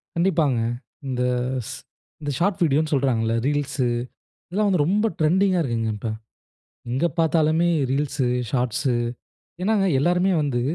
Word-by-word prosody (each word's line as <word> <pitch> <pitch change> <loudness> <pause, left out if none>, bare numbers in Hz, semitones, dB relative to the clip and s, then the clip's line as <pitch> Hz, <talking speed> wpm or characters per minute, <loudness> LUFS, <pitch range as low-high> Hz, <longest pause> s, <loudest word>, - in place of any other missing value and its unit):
கண்டிப்பாங்க, 165 -7 +2 0.5
இந்த 125 -1 -2 0.4
இஸ் 110 - -7 0.5
இந்த 145 - -2
ஷார்ட் 190 +1 +1
வீடியோனு 155 0 +2
சொல்றாங்கல்ல? 120 -5 +1
ரீல்ஸ், 145 -2 0 0.7
இதெல்லாம் 205 +3 +1
வந்து 180 -6 +2
ரொம்ப 205 +5 +2
ட்ரெண்டிங்கா 185 +4 +3
இருக்குங்க 115 -6 -1
இப்ப. 110 +2 -4 0.8
எங்கே 135 +8 +1
பாத்தாலுமே 160 +1 +3 0.2
ரீல்ஸ், 140 +1 -1 0.3
ஷார்ட்ஸ் 125 -1 -1 0.8
ஏன்னாங்க 205 0 +2
எல்லோருமே 180 +6 +2
வந்து 130 -4 0
150 Hz, 115 wpm, -23 LUFS, 130-180 Hz, 0.8 s, ட்ரெண்டிங்கா